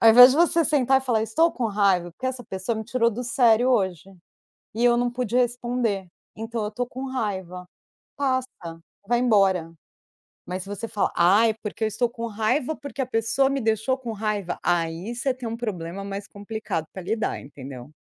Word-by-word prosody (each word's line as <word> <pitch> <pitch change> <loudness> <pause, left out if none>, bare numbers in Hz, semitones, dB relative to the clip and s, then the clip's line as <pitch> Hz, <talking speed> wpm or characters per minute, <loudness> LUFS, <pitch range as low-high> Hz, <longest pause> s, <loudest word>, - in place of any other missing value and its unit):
Ao 225 - +7
invés 250 +3 +10
de - - -1
você 335 0 +4
sentar 270 -3 +3
e - - -13
falar: 235 -4 +2
"Eu - - 0
estou 320 +10 +3
com 250 - -3
raiva 195 -4 +2
porque 260 - -5
essa 255 -1 -4
pessoa 190 +4 -3
me 220 - -4
tirou 235 +1 +1
do 240 +3 -5
sério 245 0 +4
hoje, 190 -6 0 0.6
e 230 +2 0
eu 240 -1 +5
não 245 0 +1
pude 245 -1 -2
responder, 240 -5 0 0.3
então 225 +1 -4
eu 210 - -1
estou 245 +4 -3
com 260 +2 -6
raiva". 190 -8 -4 0.5
Passa, 260 -2 0 0.6
vai 240 +1 +2
embora, 195 -8 +2 0.7
mas 180 +1 -4
se 195 - -12
você 205 +3 -5
fala: 205 -2 0
"Ai, 205 +6 +5
é - - -8
porque 215 +1 -4
eu - - +3
estou 235 +3 0
com 235 0 -6
raiva 230 +7 0
porque 285 -1 -6
a - - 0
pessoa 255 +3 +1
me 275 0 -1
deixou 220 +3 +1
com 245 -3 -6
raiva". 205 -4 -2
Aí 175 +5 -1
você 260 +2 0
tem 250 -2 -6
um 230 - -4
problema 195 -5 -4
mais 200 0 -6
complicado 205 -5 -4
para 190 - -6
lidar, 220 +4 -1
entendeu? 135 -2 -10
225 Hz, 200 wpm, -24 LUFS, 195-250 Hz, 0.7 s, invés